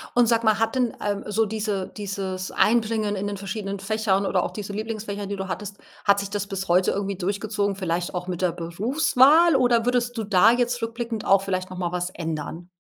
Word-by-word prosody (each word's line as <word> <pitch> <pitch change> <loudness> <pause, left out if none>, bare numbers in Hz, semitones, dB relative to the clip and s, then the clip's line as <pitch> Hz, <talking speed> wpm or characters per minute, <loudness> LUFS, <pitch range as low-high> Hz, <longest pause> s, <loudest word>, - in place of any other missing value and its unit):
Und 245 -1 +5
sage 230 0 +2
mal, 215 -1 +3
hat 225 +2 0
denn, 250 -3 0
ähm, 205 -1 -1
so 220 +2 +1
diese 205 -3 -2
dieses 190 -2 -4
Einbringen 220 -2 +1
in 195 +1 -3
den 205 - -3
verschiedenen 200 0 -4
Fächern 200 -1 0
oder 180 - +1
auch - - -3
diese 205 -1 -6
Lieblingsfächer, 210 -2 -4
die 200 - -4
du 190 0 -5
hattest 200 +1 -5 0.3
hat 200 -1 +4
sich 200 - -4
das 205 -1 -2
bis 195 -1 -5
heute 180 +2 +4
irgendwie 200 0 -2
durchgezogen, 200 +1 -1
vielleicht 175 -1 -2
auch 180 0 -3
mit 180 0 -4
der 180 -2 +2
Berufswahl? 265 - +4
Oder 245 -3 +3
würdest 245 -1 0
du 220 - -1
da 200 +1 +5
jetzt 245 0 0
rückblickend 230 -1 -3
auch 195 0 +5
vielleicht 185 -1 -3
noch 185 - -7
mal 175 -1 -2
was 180 0 -2
ändern? 165 0 -5
205 Hz, 210 wpm, -24 LUFS, 190-225 Hz, 0.3 s, Und